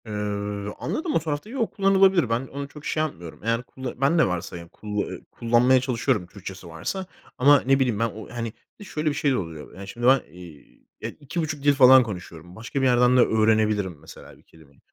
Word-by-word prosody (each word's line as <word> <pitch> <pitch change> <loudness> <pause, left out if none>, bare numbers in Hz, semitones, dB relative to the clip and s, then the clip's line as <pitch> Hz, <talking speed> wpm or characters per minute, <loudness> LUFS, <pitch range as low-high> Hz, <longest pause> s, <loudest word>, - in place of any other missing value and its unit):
Eee, 110 - -7 0.7
anladım, 315 0 -2
o - - +4
tarafta 155 +4 -4
yok, 240 -2 -2
kullanılabilir. 195 - +4
Ben 120 +3 -1
onu 140 +1 -6
çok 150 +1 -13
şey 155 - 0
yapmıyorum. 85 - -7
Yani 115 +1 0
kulla 130 0 -8
ben 140 +5 +3
de - - +5
varsa, 90 -1 -4
ya, 85 0 -10
kulla 105 +3 -4
eee, - - -9
kullanmaya 120 +2 +3
çalışıyorum 125 -6 -1
Türkçesi 95 -1 -10
varsa 85 - -5 0.3
ama, 140 +2 +6
ne 135 +1 +3
bileyim, 125 -6 +1
ben 115 - +2
o, 110 0 -10
hani, 115 -2 -4 0.3
bir 205 - -10
de - - -13
şöyle 155 0 -1
bir - - -1
şey 145 -1 +1
de 130 - +1
oluyor: 80 -5 -7
Yani, 95 +1 -9
şimdi 120 +4 -2
ben, 130 0 +6
eee, 85 -4 -14 0.2
ya, - - -3
2,5 150 0 -4
dil 145 0 +5
falan 130 -1 +8
konuşuyorum. 90 -5 -9
Başka 115 +5 -4
bir - - +2
yerden 125 0 +4
de - - +7
öğrenebilirim 110 -5 +2
mesela 80 - -13
bir - - -24
kelimeyi. 70 -4 -21
125 Hz, 215 wpm, -24 LUFS, 100-145 Hz, 0.7 s, falan